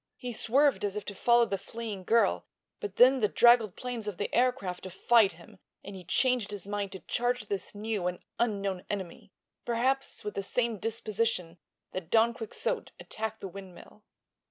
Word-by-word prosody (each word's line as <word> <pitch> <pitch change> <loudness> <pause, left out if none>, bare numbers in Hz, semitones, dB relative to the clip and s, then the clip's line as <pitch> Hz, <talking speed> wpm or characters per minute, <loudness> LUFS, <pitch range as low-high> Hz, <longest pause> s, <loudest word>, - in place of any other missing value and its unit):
He 250 -2 -5
swerved 270 +5 +3
as 205 -1 -1
if 210 -1 -4
to 205 - -5
follow 235 +4 +4
the 195 -3 -3
fleeing 220 -3 -6
girl, 230 +3 +2 0.3
but 420 - -6
then 260 +2 +6
the 215 - +3
draggled 235 -3 +5
planes 245 -4 -5
of 205 -4 -4
the - - -3
aircraft 245 -8 +1
defied 200 +2 +3
him 185 +4 -16 0.2
and 200 - -8
he 185 - -9
changed 250 +2 +1
his 205 -3 -5
mind 205 -1 -3
to 190 - -8
charge 245 +5 -1
this 200 -1 -3
new 210 -3 -2
and 180 0 -2 0.2
unknown 200 -5 -1
enemy—perhaps 235 +7 -3
with 210 - -4
the 200 - -2
same 230 +2 -1
disposition 215 -6 -2 0.3
that 180 -3 -6
Don 230 +2 +4
Quixote 240 - -2
attacked 220 0 -5
the - - -4
windmill. 190 +1 -12
215 Hz, 170 wpm, -29 LUFS, 195-235 Hz, 0.3 s, then